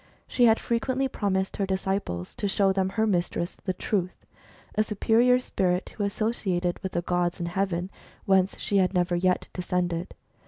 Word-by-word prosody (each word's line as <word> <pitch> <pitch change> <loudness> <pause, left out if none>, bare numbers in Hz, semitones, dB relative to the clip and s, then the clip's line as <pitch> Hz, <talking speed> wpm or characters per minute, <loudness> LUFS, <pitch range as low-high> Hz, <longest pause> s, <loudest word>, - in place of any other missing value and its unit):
( - - -38
She 245 - +6
had 225 -1 +5
frequently 260 +3 0
promised 190 -6 -1
her 195 - 0
disciples 190 - -2
to 205 - -1
show 195 0 +3
them 190 -1 +1
her 220 +3 +1
mistress, 175 -3 -1
the 185 - 0
Truth, 185 -1 -2 0.5
a 215 - +2
superior 230 +4 +3
spirit 185 -6 -1
who 210 - -4
associated 200 -4 -1
with 190 -2 -4
the 175 - -1
gods 175 0 0
in 170 - -2
heaven, 180 0 -1 0.3
whence 190 -1 +3
she 200 - 0
had 185 0 +2
never 175 0 +2
yet 180 +1 +1
descended. 175 -1 -2
190 Hz, 170 wpm, -27 LUFS, 180-210 Hz, 0.5 s, She